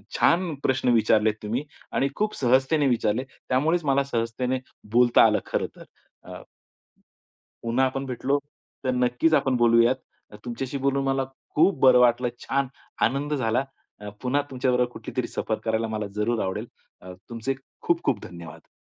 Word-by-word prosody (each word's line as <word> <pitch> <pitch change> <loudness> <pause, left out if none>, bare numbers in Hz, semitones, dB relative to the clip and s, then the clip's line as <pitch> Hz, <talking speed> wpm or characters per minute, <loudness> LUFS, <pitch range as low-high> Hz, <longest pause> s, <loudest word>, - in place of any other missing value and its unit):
छान 175 -1 +2
प्रश्न 130 -1 +1
विचारलेत 110 -1 +3
तुम्ही 115 +6 -2 0.3
आणि 135 - +1
खूप 215 0 -1
सहजतेने 135 +3 +2
विचारले, 120 0 +1 0.3
त्यामुळेच 160 +7 +2
मला 140 0 +3
सहजतेने 125 0 -2 0.3
बोलता 120 0 +6
आलं - - +3
खरंतर. - - -3 0.4
अ, - - -9 1.2
पुन्हा 120 +3 +2
आपण 135 +1 -2
भेटलो, 130 +2 -1 0.4
तर 130 - +1
नक्कीच 125 +5 +2
आपण 135 -3 +3
बोलूयात. 120 +1 +4 0.5
तुमच्याशी 125 +3 -4
बोलून 140 0 0
मला 135 0 +1 0.3
खूप 170 0 +4
बरं 130 -1 +7
वाटलं 125 0 +3
छान 135 +2 -1 0.4
आनंद 140 +4 -1
झाला 125 -2 +1 0.4
अ, 105 - -7
पुन्हा 130 +3 +1
तुमच्या 130 -1 0
बरोबर 125 0 +2
कुठलीतरी - - -4
सफर - - -3
करायला 110 0 0
मला 110 -1 -3
जरूर 110 +2 0
आवडेल. 95 0 -3 0.3
अ, 90 0 -10 0.2
तुमचे 120 +3 -3 0.3
खूप-खूप 165 -9 +1
धन्यवाद. 85 -2 -11
125 Hz, 145 wpm, -25 LUFS, 115-135 Hz, 1.2 s, बरं